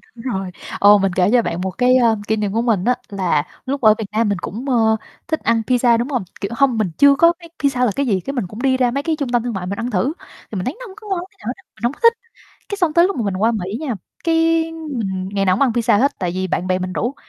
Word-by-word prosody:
đúng 230 - -11
rồi, 190 -1 -3 0.3
ồ, 205 +1 +7
mình 195 -2 0
kể 185 +1 +3
cho 245 0 +5
bạn 175 -5 -3
một 190 0 -2
cái, 250 0 +4
ơ, 230 -3 +3
kỷ 220 - +2
niệm 210 -2 -2
của 230 - +1
mình 220 -6 +1
á 250 +1 +3
là 180 -7 0 0.2
lúc 275 +1 -2
ở 215 -3 +7
Việt 220 - -2
Nam 220 0 +1
mình 200 - 0
cũng, 240 +11 -5
ơ, 225 -3 +3 0.3
thích 315 -2 -1
ăn 230 0 +2
pizza, 245 -2 +3
đúng 240 +2 -1
hông? 255 -7 -1 0.2
Kiểu, 200 - -3
hông 255 -1 +2
mình 210 -5 0
chưa 280 0 +6
có 335 +4 +5
biết 340 - -12 0.2
pizza 255 -3 +2
là 230 - +1
cái 280 - 0
gì, 200 -5 +2
cái 275 - -5
mình 245 -9 -2
cũng 210 +6 -9
đi 260 -1 +2
ra 250 -2 +2
mấy 280 +3 -2
cái 325 -1 0
trung 280 -4 -2
tâm 240 -1 +1
thương 240 -2 -3
mại 190 -2 -4
mình 200 +3 -4
ăn 240 +2 -3
thử, 240 +10 0 0.4
thì - - -5
mình 180 - -3
thấy 265 - -3
nó - - -8
hông 380 - -12
có 425 0 -13
ngon 380 -2 0
tí - - -30
nào 210 - -10
hết 245 - -1
á, 385 - -20
mình 215 - -18
hông 240 +3 +1
có - - -17
thích. 465 0 +7 0.6
Cái 405 - -3
xong 350 -6 +1
tới 340 +2 +5
lúc 390 - -3
mà 240 - -1
mình 195 -2 -1
qua 220 +5 +2
Mỹ 200 -1 -3
nha, 285 -7 -2 0.3
cái 330 0 +3
mình 230 -13 -4
ngày 195 -1 +1
nào 185 -1 +3
cũng - - +1
ăn 270 - +3
pizza 230 -2 +2
hết 280 +4 +1
tại 180 - -1
vì 185 0 -1
bạn 180 0 -2
bè 185 0 +1
mình 185 0 -4
rủ, 240 +8 -2
235 Hz, 310 wpm, -19 LUFS, 200-275 Hz, 0.6 s, ồ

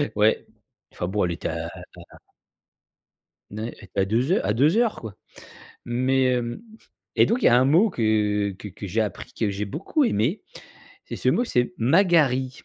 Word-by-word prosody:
Ouais, 105 +1 +2 0.5
enfin 90 - -4
bon, 100 0 0
elle 85 - -1
était 85 - -4
à - - -4
à - - -10 0.3
à - - -14 1.3
N 105 - -8
ouais, 115 +2 -5 0.2
à 95 - +3
2 120 - 0
heur - - +1
à 105 - +2
2 145 - +3
heures, 235 -2 +2
quoi. 110 -4 -8 0.7
Mais, 130 +2 +1
hem, 125 - -1 0.5
et - - +5
donc 240 +2 0
il - - +1
y - - +8
a 120 - +6
un 130 - +4
mot 170 +11 +4
que 105 - 0
que 105 - -8
que 100 +1 -9
j'ai 110 +5 0
appris, 105 -4 -5
que 110 -3 0
j'ai 100 +1 -3
beaucoup 190 - -1
aimé. 140 - 0 0.6
C'est - - -7
ce - - -1
mot 245 - +2
c'est: 125 - 0
«Magari». 140 - +3
120 Hz, 190 wpm, -24 LUFS, 105-150 Hz, 1.3 s, y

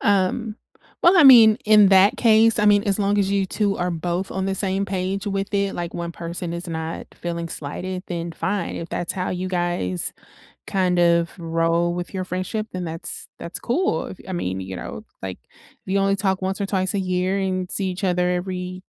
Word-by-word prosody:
um, 205 +3 +1 0.5
well, 350 +3 +6
I - - +8
mean, 225 -5 +9
in 210 -2 +7
that 195 +5 +5
case, 225 -1 +4
I 210 - +2
mean, 205 0 +5
as 200 -2 +2
long 205 0 +1
as 195 -1 +2
you 200 -1 +2
2 200 0 0
are 180 0 -1
both 175 +3 -2
on 190 0 -2
the 195 - 0
same 195 0 -1
page 190 +1 -3
with 195 0 -2
it, 200 -1 0
like, 175 -1 -5
1 170 0 -4
person 170 0 -5
is 170 +1 -5
not 160 0 -4
feeling 170 -1 -4
slighted, 180 +6 -5
then 170 -1 -4
fine. 185 +2 -2
If 170 - -6
that's 175 +1 -2
how 185 -1 -3
you 185 +1 -3
guys 175 - -2 0.5
kind 185 -2 +1
of 170 -1 +3
roll 165 +1 0
with 175 +2 -5
your 185 -1 -2
friendship, 185 +4 -3
then 180 -1 -4
that's 165 0 -6
that's 170 - -6
cool. 245 - 0
If, 190 - -10
I - - -4
mean, 95 - -2
you 95 0 -6
know, - - -7 0.2
like, 95 -1 -5
if 190 - -12
you 200 - +3
only 195 0 +2
talk 190 -1 0
once 190 +2 -2
or 200 - 0
twice 190 -1 0
a - - +1
year 185 +1 0
and 185 -1 -2
see 195 - 0
each 185 +2 -5
other 180 -1 +1
every 180 0 -3
185 Hz, 210 wpm, -22 LUFS, 175-200 Hz, 0.5 s, mean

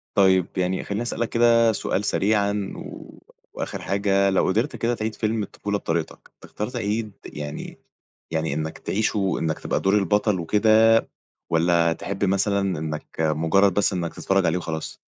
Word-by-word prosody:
طيب، 95 -2 +4
يعني 95 0 0
خلّيني 100 +2 -3
أسألك 120 -1 -2
كده 115 -1 +4
سؤال 100 -2 -2
سريعًا 100 -1 +1
و - - -10 0.3
وآخر - - -5
حاجة، 100 0 +1
لو 95 - +2
قدرت 115 +9 0
كده 120 +1 0
تِعيد 110 -1 -3
فيلم 110 0 -1
الطفولة 105 +1 -3
بطريقتك، 85 -4 -4
تختار 105 - -5
تِعيد 110 -3 -2
يعني 75 -1 -7 0.5
يعني 80 -2 -1
إنّك 80 +1 -3
تعيشه 100 -2 0
إنك 80 -1 -1
تبقى - - -1
دور 95 - +1
البطل 105 0 +1
وكده، 110 +5 +4 0.6
والّا 85 0 +3
تحب 100 +4 -3
مثلًا 100 -2 +1
إنك 75 0 -6
مجرد 80 +5 +3
بس 105 - +2
إنّك 85 -3 -3
تتفرج 95 -1 +1
عليه 80 +2 +1
وخلاص؟ 80 -2 -5
100 Hz, 150 wpm, -24 LUFS, 85-105 Hz, 0.6 s, طيب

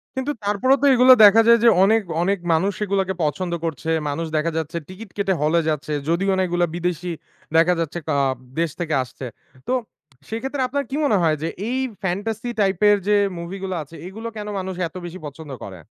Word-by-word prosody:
কিন্তু 265 +3 -1
তারপরও 210 +7 +3
তো, - - +3
এগুলো 255 +1 +8
দেখা 210 +3 +7
যায় 235 0 +8
যে 235 - +8
অনেক, 220 +3 +4 0.2
অনেক 195 +1 +1
মানুষ 190 +5 +1
এগুলাকে 195 -1 0
পছন্দ 170 +4 -1
করছে। 160 0 -4 0.2
মানুষ 165 +4 -2
দেখা 165 +2 0
যাচ্ছে 160 +1 -3
টিকিট 195 +2 -10
কেটে 195 -1 +1
হলে 155 +3 +3
যাচ্ছে, 150 0 -2 0.2
যদিও 195 +4 +1
না - - +2
এগুলা 175 0 +1
বিদেশি 175 0 -2 0.5
দেখা 170 +2 +5
যাচ্ছে 165 +1 -3 0.2
আ - - +2 0.4
দেশ 170 - +1
থেকে 160 -3 -2
আসছে। 130 +2 -10 0.4
তো 255 - 0 0.6
সেক্ষেত্রে 265 +5 -3
আপনার 280 +2 -2
কি 275 - -3
মনে 215 -8 +3
হয়? 160 -2 +3
যে, 160 - -1 0.2
এই 255 - -1 0.3
Fantasy 210 +6 -2
type 195 -1 +1
এর 205 - +5
যে 210 - +4 0.2
মুভি 170 +3 -6
গুলো 190 -1 -3
আছে, 155 +3 -15
এগুলো 220 +4 -7
কেন 210 - -5
মানুষ 190 0 -4
এত 165 - -20
বেশি 175 +2 -8
পছন্দ 150 0 -9
করে? 95 -3 -9
185 Hz, 195 wpm, -22 LUFS, 165-210 Hz, 0.6 s, এগুলো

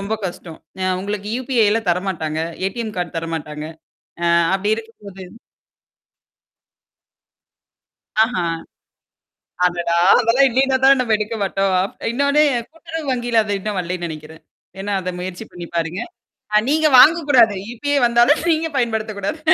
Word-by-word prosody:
ரொம்ப 200 +3 -2
கஷ்டம். 175 -2 -9 0.2
அ - - 0 0.2
உங்களுக்கு 205 +1 -4
U-P-I 245 -4 +2
ல 230 - 0
தரமாட்டாங்க 170 -4 -2 0.3
A-T-M 220 +2 -5
கார்ட் 175 -1 -4
தரமாட்டாங்க. 155 -2 -5 0.6
ஆ - - +1 0.3
அப்பிடி 205 +3 0
இருக்கும் 225 -1 -11
போது 190 -1 -10 3.0
ஆஹா! 220 -6 0 1.2
அடடா! 175 -1 0 0.2
அதெல்லாம் 250 +4 +4
இல்லேன்னா 265 +2 +2
தான் 275 -1 +6
நம்ம 225 -3 0
எடுக்க 215 +2 -4
மாட்டோம். 195 -1 0 0.4
இன்னோன்னு 280 +4 +2 0.3
கூட்டுறவு 325 0 -7
வங்கியில 240 -2 +1
அது 205 -1 -2
இன்னும் 205 0 -4
வரலைன்னு 180 0 -4
நினைக்கிறேன். 155 0 -10 0.4
ஏன்னா, 200 +1 -3
அத 185 - -4
முயற்சி 180 0 -6
பண்ணி 175 -1 -8
பாருங்க. 170 +4 -2 0.5
அ - - +7
நீங்க 310 +1 +3
வாங்கக்கூடாது. 280 -8 +5 0.2
U-P-I 285 +4 -1
வந்தாலும் 240 +6 +3
நீங்க 320 0 0
பயன்படுத்தக்கூடாது. 220 0 -2
210 Hz, 125 wpm, -19 LUFS, 180-250 Hz, 3.0 s, அ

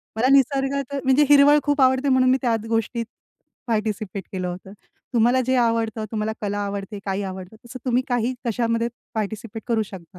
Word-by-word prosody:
मला 240 +4 +2
निसर्गात 275 0 +2
म्हणजे 265 +3 +4
हिरवळ 290 +1 +7
खूप 290 -1 +1
आवडते 260 +2 +3
म्हणून 255 -1 +4
मी 260 - +4
त्या 235 -3 +2
गोष्टीत 230 +1 -1 0.6
पार्टिसिपेट 215 -3 -2
केलं 185 -2 -3
होतं. 185 +2 -7 0.4
तुम्हाला 240 +3 +3
जे 260 0 +1
आवडतं 230 -2 0
तुम्हाला 220 0 -2
कला 205 0 -2
आवडते, 200 0 -5
काही 195 +1 -2
आवडतं 190 +2 -7
तसं 255 +1 -10
तुम्ही 250 +1 +2
काही 245 0 0
कशामध्ये 230 0 0 0.3
पार्टिसिपेट 220 +1 -4
करू 225 -2 +1
शकता. 185 -4 -10
230 Hz, 165 wpm, -23 LUFS, 210-260 Hz, 0.6 s, हिरवळ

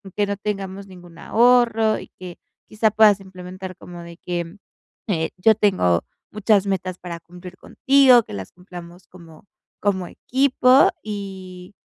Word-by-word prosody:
que 205 -1 0
no 200 -1 -3
tengamos 195 -1 -5
ningún 175 -3 -15
ahorro". 230 0 +2
Y - - -12
que, 180 -1 -9 0.3
quizá 215 0 0
puedas 210 -1 +5
implementar 185 0 -10
como 175 -1 -11
de 170 0 -12
que: 175 +1 -5 0.5
"Eh, 165 -6 -1
yo 220 +4 +4
tengo 185 - +1 0.3
muchas 210 -1 +1
metas 185 -2 -3
para 170 -2 -8
cumplir 180 +2 -13
contigo. 270 -1 +4
Que - - -12
las 95 -2 -7
cumplamos 180 0 -13
como 165 -2 -16 0.4
como 190 -3 -1
equipo. 260 +2 +3
Y 190 -3 -8
190 Hz, 140 wpm, -21 LUFS, 180-215 Hz, 0.5 s, puedas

